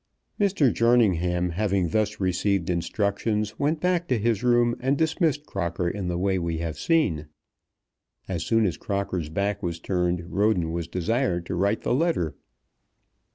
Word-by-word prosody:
Mr. 190 - +3
Jerningham, 90 -7 +2
having 95 -1 0
thus 110 +3 0
received 95 -1 0
instructions, 105 +4 -1
went 150 +3 +1
back 180 0 0
to 125 - +1
his 115 0 0
room 120 -1 +3
and 135 +3 +1
dismissed 160 -2 +1
Crocker 85 - -2
in 95 +1 -3
the 90 -1 -1
way 95 +1 +1
we 85 -1 -2
have 80 -3 -4
seen. 95 - +1 1.0
As 85 -3 -2
soon 115 +4 +2
as 90 - -1
Crocker's 95 -5 -3
back 100 +4 -1
was 85 -1 -3
turned 90 -1 -1
Roden 95 -4 +2
was 85 0 -3
desired 90 -1 -1
to 85 - -3
write 100 +4 0
the - - +1
letter. 125 - 0
100 Hz, 155 wpm, -25 LUFS, 85-120 Hz, 1.0 s, Mr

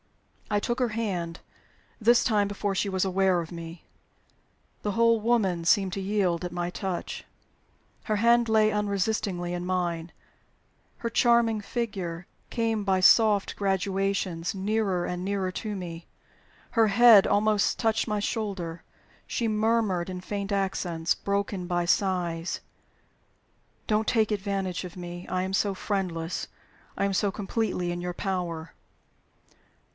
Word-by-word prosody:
I 210 -1 +2
took 240 +4 -2
her 250 -2 +2
hand, 190 -7 -3 0.6
this 235 +2 +5
time, 210 -4 +2
before 205 0 -2
she 200 - 0
was 190 0 0
aware 190 -1 +2
of 165 -2 -5
me. 165 0 -8 1.0
The 205 - -2
whole 230 0 +3
woman 205 -7 +1
seemed 190 +1 +3
to 195 - -3
yield 190 -3 0
at 175 - -3
my 175 0 -2
touch. 185 -2 -4 0.8
Her 215 -2 0
hand 235 +2 +4
lay 215 -1 +4
unresistingly 200 -3 -1
in 175 0 -3
mine; 175 -2 -2 0.9
her 235 - -3
charming 230 -2 +3
figure 190 -7 -4 0.2
came 225 -3 0
by 190 -1 +2
soft 205 +1 +5
gradations 195 -3 -1
nearer 195 -2 0
and 180 0 -3
nearer 195 -1 -1
to 215 +2 -4
me; 170 -3 -7 0.6
her 225 -2 +4
head 220 -1 +7
almost 210 0 +2
touched 225 -1 +1
my 210 -1 0
shoulder. 195 -7 -3 0.4
She 235 - -1
murmured 215 -5 +1
in 185 -1 -5
faint 200 +2 -4
accents, 185 -4 0
broken 200 -2 -2
by 175 -1 0
sighs, 175 -2 0 1.3
"Don't 215 0 +1
take 220 -2 +2
advantage 195 -3 -2
of 180 0 -9
me. 175 0 -7
I 185 0 -1
am 190 +1 -3
so 195 +1 +1
friendless; 180 -4 -2 0.5
I - - +1
am 200 - 0
so 200 +1 +1
completely 200 -3 -2
in 175 0 -4
your 180 0 -3
power." 175 -5 -3
195 Hz, 140 wpm, -27 LUFS, 180-215 Hz, 1.3 s, head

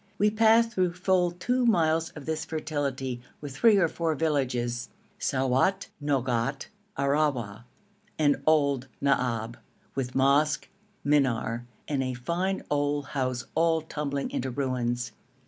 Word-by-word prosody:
We 210 +1 +3
passed 225 +1 +4
through 185 -5 +1
full 180 0 +2
two 245 +9 -1
miles 165 -7 +3
of 150 -3 -9
this 160 0 -2
fertility, 145 -6 -3 0.2
with 145 -2 -7
three 220 +6 +5
or 175 -4 +4
four 165 0 -1
villages 125 -6 -1 0.3
Souat, 135 +9 +1
Nogat, 135 -1 0 0.3
Arrawa, 140 -7 0 0.5
and 145 -3 +2
Old 140 -4 +3
Naab, 120 -4 0 0.4
with 130 -2 -3
mosque, 140 +3 +3 0.4
minar, 120 -5 +1 0.2
and 140 -3 0
a 130 -1 -2
fine 175 +10 -2
old 145 -1 0
house 130 -3 -2
all 165 0 +2
tumbling 145 -3 -3
into 130 - -2
ruins. 125 -2 -2
145 Hz, 125 wpm, -27 LUFS, 130-160 Hz, 0.5 s, three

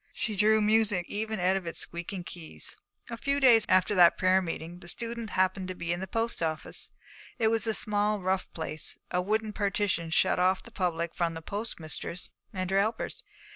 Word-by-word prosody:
She 215 -3 -2
drew 215 +2 +4
music 210 -4 +3
even 220 0 -3
out 185 +2 +3
of 190 -3 -3
its 170 - -5
squeaking 175 +2 -5
keys. 170 -2 -4 0.4
A 230 - -4
few 280 +4 0
days 235 -5 +6
after 185 +2 +4
that 175 -3 +6
prayer 185 0 +4
meeting 170 0 -5
the 175 - -12
student 230 +3 -2
happened 185 0 +1
to 185 - -5
be 170 -1 -2
in 175 - -4
the 190 - -4
post 225 +2 -1
office. 160 -1 -2 0.5
It 225 -2 +3
was 225 +1 0
a 220 - +1
small, 210 0 +1
rough 190 0 -1
place; 155 -1 -2
a 180 - +1
wooden 215 +3 -1
partition 200 -5 0
shut 160 - +3
off 185 +1 +2
the 235 - -13
public 170 -4 -1
from 170 -1 -1
the 165 - -7
postmistress 180 -4 -5 0.2
and 185 -3 -3
her 195 - +4
helpers. 220 +3 -1
190 Hz, 195 wpm, -29 LUFS, 175-220 Hz, 0.5 s, days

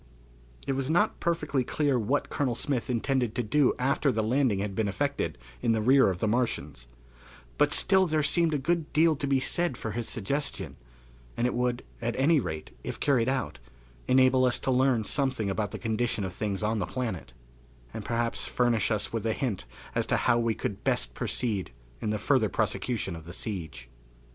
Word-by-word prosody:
It - - -1
was 135 0 -2
not 170 +2 +2
perfectly 150 -6 0
clear 140 0 +1
what 125 +7 -1
Colonel 130 -5 0
Smith 130 0 -1
intended 125 -1 0
to 125 - 0
do 130 +5 +3
after 140 +2 +1
the 110 -2 0
landing 120 -1 +2
had 100 0 -2
been 110 +1 0
effected 95 -9 -1 0.2
in 115 - +2
the 110 - +1
rear 130 -1 +6
of 95 - -2
the 110 - -1
Martians, 115 - -1 0.7
but - - +4
still 190 -1 +4
there 155 -2 +1
seemed 165 0 +2
a - - +2
good 160 +3 -1
deal 160 +1 +4
to 140 0 -3
be 135 -1 +3
said 170 0 0
for 110 - -4
his 115 +2 -3
suggestion, 105 - -2 0.6
and 120 - +1
it 125 - +1
would, 125 0 -1 0.2
at 120 0 -1
any 150 +4 +4
rate, 80 - -5
if - - -5
carried 130 -4 +2
out, 135 -2 -2 0.5
enable 130 0 +5
us 125 - +2
to 130 - 0
learn 130 -3 +3
something 130 -5 0
about 105 +1 -1
the - - -6
condition 115 -1 -1
of 95 -2 -4
things 105 -1 -3
on 110 +1 0
the 90 - -2
planet, 110 - -4 0.6
and - - -5
perhaps 115 0 -1
furnish 120 -3 +1
us 110 -1 -1
with 115 - -2
a 110 -1 +1
hint 110 - -2 0.3
as - - 0
to - - +2
how 120 - +3
we 115 -1 +1
could 100 - -4
best - - 0
proceed 105 - -2 0.3
in - - -1
the 105 - 0
further 115 -2 +2
prosecution 105 -2 -1
of 80 -1 -10
the 85 - -8
siege. 80 - -5
120 Hz, 195 wpm, -28 LUFS, 105-135 Hz, 0.7 s, rear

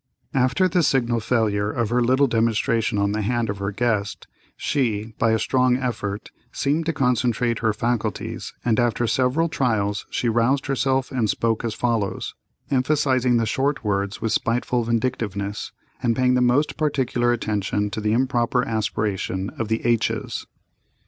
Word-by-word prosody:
After 135 +9 +3
the 180 0 +2
signal 120 -6 +2
failure 105 -3 +1
of 115 0 -1
her 125 +1 +2
little 130 +4 +4
demonstration 115 -2 +1
on 100 0 +1
the 110 +1 -1
hand 115 0 0
of 100 - -7
her 100 0 -2
guest, 105 -1 -1 0.3
she, 110 -5 -1
by 115 - +3
a 110 - +3
strong 125 +2 +2
effort, 110 -5 -4 0.2
seemed 155 +4 0
to - - +3
concentrate 120 -3 +1
her 110 -2 +2
faculties, 115 +1 -2
and 115 -1 +2
after 120 0 +1
several 130 +7 +1
trials 110 -9 -1
she 120 - -1
roused 120 +4 +2
herself 135 -1 0
and 120 -5 0
spoke 115 +1 0
as 115 -2 -2
follows, 115 -5 -1 0.4
emphasizing 130 -2 +2
the 115 - +1
short 135 +4 0
words 100 0 -1
with 115 - 0
spiteful 120 +1 0
vindictiveness, 110 -4 -2 0.3
and 120 -3 +1
paying 125 0 +3
the 125 - +3
most 125 +5 +2
particular 130 -5 +1
attention 105 -3 -1
to 110 - -4
the 105 0 0
improper 125 0 +1
aspiration 105 -3 -2
of 115 - -4
the 110 +1 -2
h's. 120 -2 0
120 Hz, 155 wpm, -23 LUFS, 110-130 Hz, 0.4 s, little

